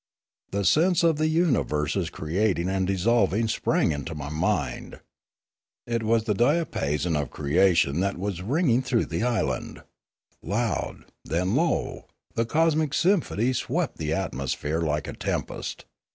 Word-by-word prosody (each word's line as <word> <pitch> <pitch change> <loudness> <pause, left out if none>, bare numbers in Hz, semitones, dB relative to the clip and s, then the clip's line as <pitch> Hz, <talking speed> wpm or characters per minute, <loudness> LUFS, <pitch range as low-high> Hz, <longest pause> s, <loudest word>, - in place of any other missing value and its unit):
The 100 0 -2
sense 170 - +4
of 160 -2 +3
uni 160 -2 +3
verses 75 +4 -1
creating 90 +3 0
and 95 -1 0
dissolving 100 +2 +2
sprang 110 - +1
into 75 +2 -4
my 75 -1 -5
mind. 75 +2 -2 0.9
It 115 -1 -1
was 115 0 +2
the 110 -2 0
diapason 95 - +1
of 75 -4 -1
creation 80 0 +2
that 100 0 0
was 95 -2 -3
ringing 130 - +2
through 125 -3 +1
the - - -3
island. 120 -4 -1 0.6
Loud, 110 +6 -2 0.2
then 90 +4 -1
low, - - 0 0.3
the 115 0 0
cosmic 155 0 +2
symphony 155 - +2
swept - - -2
the 75 -1 -2
amosphere 80 -2 -2
like 75 -2 -1
a - - -5
tempest. - - -4
100 Hz, 135 wpm, -26 LUFS, 80-125 Hz, 0.9 s, sense